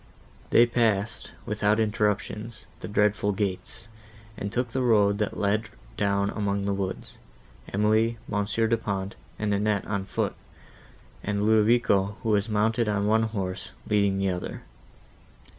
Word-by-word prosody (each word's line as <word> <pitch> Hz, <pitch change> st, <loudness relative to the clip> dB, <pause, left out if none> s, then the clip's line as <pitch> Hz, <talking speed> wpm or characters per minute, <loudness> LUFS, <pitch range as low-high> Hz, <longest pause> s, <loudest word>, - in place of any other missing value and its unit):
They 120 Hz, -, +6 dB
passed, 115 Hz, -3 st, 0 dB
without 105 Hz, +1 st, +1 dB
interruption, 105 Hz, 0 st, 0 dB, 0.3 s
the -, -, -6 dB
dreadful 105 Hz, 0 st, +2 dB
gates, 95 Hz, 0 st, -4 dB, 0.5 s
and 100 Hz, -1 st, -4 dB
took 125 Hz, +1 st, -1 dB
the 130 Hz, -, -1 dB
road 105 Hz, -4 st, +3 dB
that 105 Hz, -, -1 dB
led 105 Hz, +2 st, 0 dB, 0.3 s
down 100 Hz, 0 st, +1 dB
among 100 Hz, -2 st, -1 dB
the 100 Hz, -, 0 dB
woods, 95 Hz, -1 st, -4 dB, 0.5 s
Emily, 110 Hz, +3 st, +2 dB
Monsieur 105 Hz, +2 st, 0 dB
Du 115 Hz, +1 st, +2 dB
Pont 100 Hz, -2 st, -3 dB, 0.2 s
and 105 Hz, -1 st, 0 dB
Annette 105 Hz, 0 st, +1 dB
on 100 Hz, -2 st, -2 dB
foot, -, -, -1 dB, 0.9 s
and 105 Hz, 0 st, -1 dB
Ludovico, 105 Hz, -2 st, +3 dB
who 115 Hz, -, -1 dB
was 105 Hz, +1 st, +2 dB
mounted 110 Hz, +2 st, +1 dB
on 100 Hz, -1 st, 0 dB
one 110 Hz, +2 st, +3 dB
horse, 100 Hz, -5 st, -3 dB
leading 100 Hz, -2 st, +2 dB
the 95 Hz, 0 st, +1 dB
other. 90 Hz, -1 st, -4 dB
105 Hz, 140 wpm, -26 LUFS, 100-110 Hz, 0.9 s, They